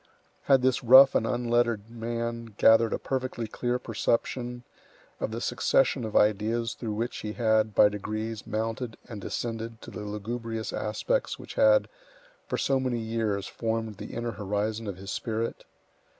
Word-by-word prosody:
Had 135 Hz, -2 st, +4 dB
this 130 Hz, -1 st, +2 dB
rough 130 Hz, +3 st, +9 dB
and 115 Hz, -, +1 dB
unlettered 120 Hz, -3 st, +1 dB
man 115 Hz, -1 st, -4 dB
gathered 115 Hz, 0 st, +6 dB
a -, -, 0 dB
perfectly 130 Hz, -3 st, -3 dB
clear 120 Hz, +3 st, -2 dB
perception 120 Hz, +1 st, -2 dB, 0.6 s
of -, -, -1 dB
the 110 Hz, +1 st, -4 dB
succession 125 Hz, +2 st, +2 dB
of 110 Hz, -, -6 dB
ideas 110 Hz, +2 st, +2 dB
through 110 Hz, -3 st, -4 dB
which 115 Hz, +3 st, -3 dB
he 105 Hz, 0 st, -5 dB
had, 110 Hz, -3 st, +2 dB
by -, -, +7 dB
degrees, 110 Hz, +2 st, -4 dB
mounted 115 Hz, +2 st, -3 dB
and 105 Hz, -4 st, -7 dB
descended 115 Hz, +1 st, -4 dB
to -, -, -9 dB
the -, -, -7 dB
lugubrious 110 Hz, +2 st, -4 dB
aspects -, -, -1 dB
which -, -, -10 dB
had, -, -, +5 dB, 0.6 s
for -, -, -2 dB
so 135 Hz, -1 st, +1 dB
many 130 Hz, -2 st, -1 dB
years, 110 Hz, -3 st, -1 dB
formed 110 Hz, -2 st, -3 dB
the 105 Hz, +1 st, -8 dB
inner 120 Hz, 0 st, -2 dB
horizon 105 Hz, +2 st, -2 dB
of 100 Hz, -3 st, -4 dB
his 95 Hz, +1 st, -7 dB
spirit? 115 Hz, +2 st, -3 dB
115 Hz, 155 wpm, -28 LUFS, 110-120 Hz, 0.6 s, rough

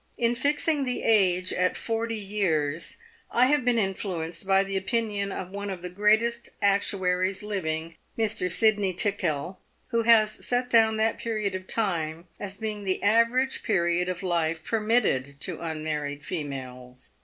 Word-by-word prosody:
In 235 Hz, 0 st, +2 dB
fixing 290 Hz, +3 st, +1 dB
the 250 Hz, -1 st, -2 dB
age 185 Hz, -4 st, +3 dB
at 185 Hz, 0 st, +1 dB
forty 225 Hz, 0 st, -1 dB
years, 170 Hz, -7 st, -1 dB, 0.3 s
I 245 Hz, -, +4 dB
have 290 Hz, 0 st, +2 dB
been 245 Hz, -1 st, +2 dB
influenced 185 Hz, -4 st, -2 dB
by 195 Hz, 0 st, +4 dB
the 195 Hz, 0 st, -4 dB
opinion 200 Hz, 0 st, -1 dB
of 185 Hz, -1 st, -6 dB
one 200 Hz, +1 st, -5 dB
of 185 Hz, -2 st, -6 dB
the 180 Hz, -, -5 dB
greatest 220 Hz, +4 st, +2 dB
actuaries 190 Hz, -1 st, +1 dB
living, 165 Hz, -5 st, -3 dB, 0.2 s
Mr. 220 Hz, -4 st, 0 dB
Sydney 205 Hz, -1 st, +2 dB
Tickell, 180 Hz, -4 st, -1 dB, 0.3 s
who 230 Hz, -1 st, +1 dB
has 225 Hz, -2 st, +5 dB
set 250 Hz, 0 st, 0 dB
down 220 Hz, -1 st, +5 dB
that 220 Hz, +1 st, +1 dB
period 215 Hz, -4 st, -2 dB
of 185 Hz, 0 st, -6 dB
time 170 Hz, -6 st, -1 dB
as 200 Hz, -1 st, -6 dB
being 215 Hz, -2 st, -3 dB
the 190 Hz, -1 st, -1 dB
average 230 Hz, +5 st, +3 dB
period 175 Hz, -3 st, +1 dB
of 185 Hz, +1 st, -4 dB
life 165 Hz, -3 st, 0 dB
permitted 210 Hz, -, 0 dB
to -, -, -3 dB
unmarried 155 Hz, -3 st, -4 dB
females. 130 Hz, -5 st, -6 dB
195 Hz, 150 wpm, -26 LUFS, 170-225 Hz, 0.3 s, has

